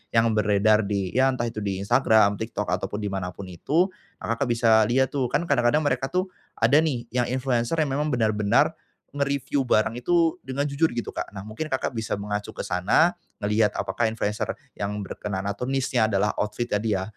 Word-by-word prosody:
yang 115 0 +4
beredar 105 0 +3
di 100 -3 -1
ya 130 +5 +3
entah 130 -2 -2
itu 115 -2 -5
di 100 -2 -3
Instagram, 110 -2 +3
TikTok 110 -2 -3
ataupun 95 +3 -2
di 100 - -1
mana 95 -2 -3
pun 100 - -8
itu, 150 - +1 0.3
Kakak, 115 +4 -1
bisa 115 -2 +4
lihat 130 +2 +2
tuh 130 -3 +1
kan - - +1
kadang-kadang 120 -1 +3
mereka 135 -2 0
tuh, 185 +1 0 0.3
ada 145 - +5
nih 130 -7 -2
yang 125 -1 +2
influencer 130 +2 0
yang - - -2
memang 150 +2 0
benar-benar, 110 -4 +2 0.4
nge-review 140 -1 0
barang 110 -2 +2
itu 165 +5 +2
dengan 135 +2 -2
jujur 145 +3 +1
gitu 120 -1 -4
Kak, - - -4
nah 100 - -8
mungkin 110 +10 -6
Kakak, 130 -2 -1
bisa 110 -1 -3
mengacu 105 0 -4
ke - - -15
sana, 100 - +3 0.2
ngelihat 105 0 +2
apakah 95 +4 0
influencer 105 -1 -2 0.2
yang 100 0 -3
berkenaan 100 -1 -4
atau 100 +3 -3
niche-nya 130 -3 +1
adalah 100 +1 +1
outfit 105 +3 -2
ya 105 - 0
dia 100 -4 0
115 Hz, 190 wpm, -25 LUFS, 105-135 Hz, 0.4 s, ada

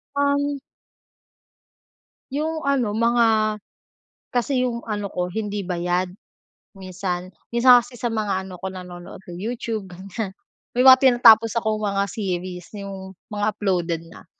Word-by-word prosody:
Um. 285 0 +1 1.7
Yung 310 +1 -2
ano, 255 -7 +2
mga 225 -1 +3 0.8
kasi 255 +1 +1
yung 235 -1 -4
ano 205 -2 -3
ko 180 -1 -3
hindi 205 -1 -3
bayad, 180 0 -1 0.7
minsan. 185 -1 -4 0.2
Minsan 245 +1 +6
kasi 245 +1 -12
sa 235 0 -2
mga 200 -4 -1
ano 185 -2 -10
ko, 190 - -3
nanonood 180 0 -10
ng 175 0 -9
YouTube 225 -3 -4
ganiyan, 190 +2 -6 0.4
may 250 - +4
mga 260 0 +9
tinatapos 230 -4 +6
akong 215 -1 0
mga 200 -1 0
series, 185 -4 -4
yung 190 -2 -8 0.2
mga 205 0 -1
uploaded 175 -5 -1
na. - - -14
210 Hz, 130 wpm, -23 LUFS, 185-235 Hz, 1.7 s, mga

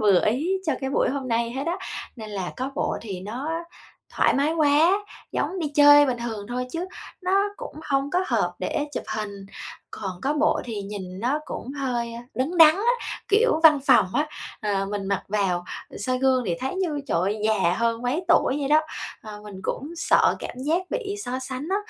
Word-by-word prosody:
vừa 200 -4 +5
ý 260 +11 +1 0.2
cho 310 - +2
cái 265 - -2
buổi - - +2
hôm 270 -1 -3
nay 230 0 +1
hết 270 +4 -4
á. 340 +2 0 0.4
Nên 220 -2 -8
là 190 -3 -4
có 260 +2 -3
bộ - - -1
thì 195 -5 -6
nó 240 +10 -4 0.7
thoải - - +4
mái 285 +4 +2
quá, 310 +2 +4 0.4
giống 380 - -1
đi 320 -4 -1
chơi 290 0 +8
bình 250 -2 -1
thường 225 -4 -5
thôi 250 +1 -2
chứ 340 +2 -3 0.4
nó 365 - 0 0.2
cũng - - -8
hông 275 0 0
có 360 +3 +1
hợp - - +1
để 295 - -1
chụp - - -3
hình, 200 -2 -5 0.4
còn 185 -3 -6
có 280 - +1
bộ 305 +1 +2
thì 220 -4 -4
nhìn 195 -2 -7
nó 255 +6 +1
cũng 265 - -6
hơi, 245 -4 -2
ơ, 235 - -6
đứng 275 +8 -1
đắn 315 -2 +9
á, 455 +5 +2 0.4
kiểu, 430 -4 +3
văn 305 -3 +7
phòng 255 -9 +6
á, 300 +1 +2 0.3
ờ, 200 -2 0
mình 200 0 -3
mặc 200 0 0
vào, 190 -4 0 0.2
ừ, - - -11
soi 255 +5 -1
gương 260 -1 +3
thì 175 - +1
thấy 265 +5 -2
như, 335 -6 -1
trời 170 - +1
ơi, 200 +4 0
già 195 -5 +3
hơn 230 0 0
mấy 275 +9 -1
tuổi 310 -5 +4
vậy 275 - -1
đó. 305 +1 +6 0.4
Ờ, 210 -1 -9
mình 205 -2 -9
cũng 285 +9 -3
sợ - - +3
cảm 250 - -7
giác 310 +7 +1
bị 435 -5 -2
so 255 +1 -2
sánh 260 +3 -5
á, 390 - +2
255 Hz, 210 wpm, -25 LUFS, 210-300 Hz, 0.7 s, đắn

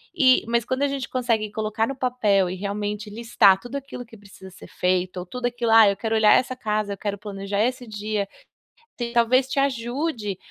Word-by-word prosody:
e 260 -6 +5
mas 235 0 0
quando 260 +2 -2
a 285 - +3
gente 275 -2 -4
consegue 230 -4 -1
colocar 215 +1 -1
no 275 - -4
papel 215 -8 +1
e 185 - -4
realmente 205 +2 -4
listar 215 -3 +3
tudo 245 +6 -9
aquilo 275 -3 -8
que 225 0 -15
precisa 195 -2 -14
ser 185 - -13
feito 180 0 -1
ou 180 - -5
tudo 250 +6 -5
aquilo 240 -1 -2
"ah, 225 -2 +8
eu 200 - 0
quero 225 +2 -1
olhar 220 -1 +6
essa 255 0 +2
casa, 215 -4 -2
eu - - -8
quero 200 +1 -3
planejar 200 0 -4
esse 250 0 -2
dia", 210 -1 -3 0.9
talvez 250 +2 +3
te 270 - -5
ajude 245 - -2
220 Hz, 200 wpm, -23 LUFS, 205-250 Hz, 0.9 s, ah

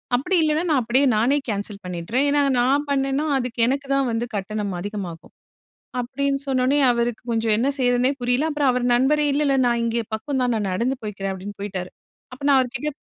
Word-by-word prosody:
அப்படி 320 +10 0
இல்லன்னா, 310 +1 +1
நான் 290 -5 +3
அப்படியே 245 +4 +2
நானே 250 +7 +3
கேன்சல் 205 -1 -4
பண்ணிட்றேன். 180 +9 -1
ஏன்னா, 290 0 +3 0.2
நான் 275 +4 +2
பண்ணேன்னா 275 +1 0
அதுக்கு 250 -2 -4
எனக்கு 275 +2 -1
தான் 275 -2 +1
வந்து 230 +1 -1
கட்டணம் 205 0 -3
அதிகமாகும்." 190 -4 -6 0.7
அப்படீன்னு 275 +3 -2
சொன்ன 260 -2 +1
உடனே, 280 +3 +3
அவருக்கு 235 -1 -1
கொஞ்சம் 225 -1 +2
என்ன 240 +4 +1
செய்யறதுன்னே 245 +1 +2
புரியல. 250 +6 +1
அப்பறம் 290 -3 +2
அவர் 250 0 -1
நண்பரே, 295 +4 +2
"இல்ல 295 +2 +1
இல்ல 275 -1 +2
நான் 235 -1 +1
இங்கே 230 0 -1
பக்கம் 265 +4 -3
தான், 245 -1 +1
நான் 210 -3 -1
நடந்து 240 +8 -1
போய்க்கிறேன்." 195 -2 -4
அப்படீன்னு 195 +2 -8
போய்ட்டாரு. 185 -3 -5 0.4
அப்ப 260 +3 -11
நான் 280 -1 +5
அவர் 250 -1 -1
கிட்ட 300 +4 -2
245 Hz, 195 wpm, -22 LUFS, 215-275 Hz, 0.7 s, நான்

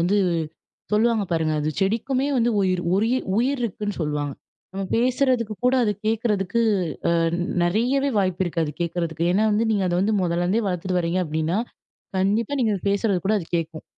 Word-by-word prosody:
வந்து, 200 +4 +2 0.7
சொல்லுவாங்க 220 -1 +3
பாருங்க. 160 -1 +1
அது 150 - -1
செடிக்குமே 245 +7 0
வந்து 240 0 +2
உயிர் 185 -2 +1
உரிய 225 +6 +2 0.2
உயிர் 260 +3 +1
இருக்குன்னு 210 -2 -3
சொல்லுவாங்க. 150 -2 -2 0.4
நம்ம 195 0 -3
பேசுறதுக்கு 245 -2 +1
கூட, 250 +1 +4
அது 210 - +1
கேட்கறதுக்கு, 215 -1 0 0.5
அ - - +2 0.5
நெறையவே 245 +10 +1
வாய்ப்பு 185 -1 0
இருக்கு, 170 -1 -1
அது 150 - -4
கேட்கறதுக்கு. 170 -1 -2
ஏன்னா 210 +3 +2
வந்து, 220 +2 +1
நீங்க 200 -3 +1
அத 175 - 0
வந்து 210 +3 +1
முதல்லருந்தே 175 +5 +1
வளர்த்துட்டு 180 0 -1
வரீங்க 175 +2 0
அப்படின்னா, 160 +5 -1 0.6
கண்டிப்பா 210 +8 +1
நீங்க 225 -3 +2
அது - - -9
பேசுறது 200 -2 +1
கூட, 215 - +3
அது 165 - -9
கேட்கும். 165 -1 -4
195 Hz, 165 wpm, -23 LUFS, 175-230 Hz, 0.7 s, கூட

